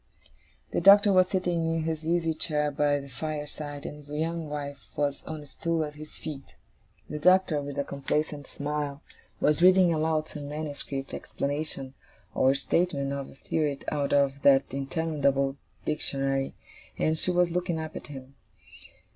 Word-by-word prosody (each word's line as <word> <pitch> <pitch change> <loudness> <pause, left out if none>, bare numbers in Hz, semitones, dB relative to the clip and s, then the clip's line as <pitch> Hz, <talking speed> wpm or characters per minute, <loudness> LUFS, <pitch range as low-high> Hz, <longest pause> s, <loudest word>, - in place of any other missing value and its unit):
The - - 0
Doctor 200 +1 +8
was 185 -1 +6
sitting 175 -3 0
in 165 - -1
his 160 0 -3
easy 165 -1 +2
chair 150 -2 0
by 145 0 +2
the 140 - -9
fireside, 145 +1 -5
and 150 - -6
his 145 -1 -13
young 160 +1 -2
wife 145 -1 -5 0.2
was 145 -1 0
on 155 -1 -5
a - - -12
stool 165 +3 -1
at 150 - -7
his 155 +1 -10
feet. 140 -3 -8 0.5
The 150 - -5
Doctor, 180 -2 +4
with 145 0 -6
a 140 - +1
complacent 145 +1 -2
smile, 145 0 -3 0.4
was 150 +2 +2
reading 185 -1 +6
aloud 155 0 +1
some 145 -1 -7
manuscript 145 -2 -4
explanation 140 -2 -3 0.4
or 130 +1 +4
statement 140 -1 +1
of 140 -1 -4
a - - -15
theory 150 0 -1
out 145 -2 0
of 140 -1 +2
that 135 -1 +6
interminable 140 -1 0 0.3
Dictionary, 135 -3 -1 0.4
and 155 0 +1
she - - +1
was 180 -1 +3
looking 175 -1 -1
up 160 -1 -6
at - - -7
him. 135 -2 -10
150 Hz, 160 wpm, -28 LUFS, 140-160 Hz, 0.5 s, Doctor